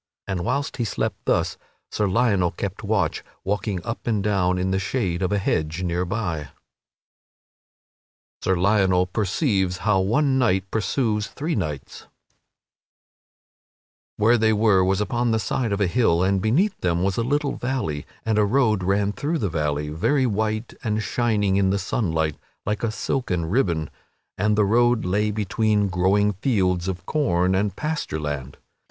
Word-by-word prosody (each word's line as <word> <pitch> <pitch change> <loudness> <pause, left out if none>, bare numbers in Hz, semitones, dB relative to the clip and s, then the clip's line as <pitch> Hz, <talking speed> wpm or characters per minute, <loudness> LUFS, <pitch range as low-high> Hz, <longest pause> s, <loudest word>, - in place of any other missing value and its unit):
And, 90 -2 -2
whilst 140 +8 -2
he 120 - 0
slept 110 - -3
thus, - - 0 0.3
Sir 105 - 0
Lionel 100 -4 +2
kept 100 +5 -5
watch, 105 -2 0 0.2
walking 100 -2 -2
up 115 +1 -5
and 110 -4 +1
down 95 -3 +1
in 95 +1 -1
the 95 - +1
shade 95 -3 -1
of 95 0 0
a 105 - +2
hedge 80 -2 -1
near 90 +1 -1
by. 90 -3 -2
[Sidenote: 75 -3 -9 1.9
Sir 95 - +1
Lionel 95 -1 +3
perceives 95 - 0
how 100 -1 +2
one 130 +8 +2
knight 95 -6 +1
pursues 110 -1 0
three 160 +4 -3
knights] 75 - -4 2.1
Where 115 +3 +4
they 110 0 +3
were 105 -3 +4
was 95 +2 +1
upon 120 +4 0
the 110 - +2
side 115 +1 -1
of 100 - -1
a 100 - +3
hill, 90 -3 +2
and 95 0 +2
beneath 170 - +1
them 85 -1 +1
was 95 -1 0
a 115 - +1
little 145 +3 0
valley; 125 - -3 0.2
and 110 -1 +2
a - - +5
road 110 -2 +2
ran 100 +2 +1
through 145 - -2
the 105 -10 -1
valley, 75 -2 -1
very 130 - +1
white 110 0 -1
and 110 -2 -1
shining 105 -6 +1
in 95 -1 +3
the 100 - +1
sunlight, 80 -6 -1 0.3
like 105 0 -1
a 115 - 0
silken 110 -6 -2
ribbon, 85 - 0 0.5
and 105 +2 +1
the 105 - +4
road 120 +2 +3
lay 105 +4 +1
between 105 0 +1
growing 95 +4 +2
fields 95 -4 0
of 95 -1 -4
corn 95 - +1
and 100 +1 0
pasture 150 - -3
land. 70 -3 -5
100 Hz, 160 wpm, -23 LUFS, 90-115 Hz, 2.1 s, a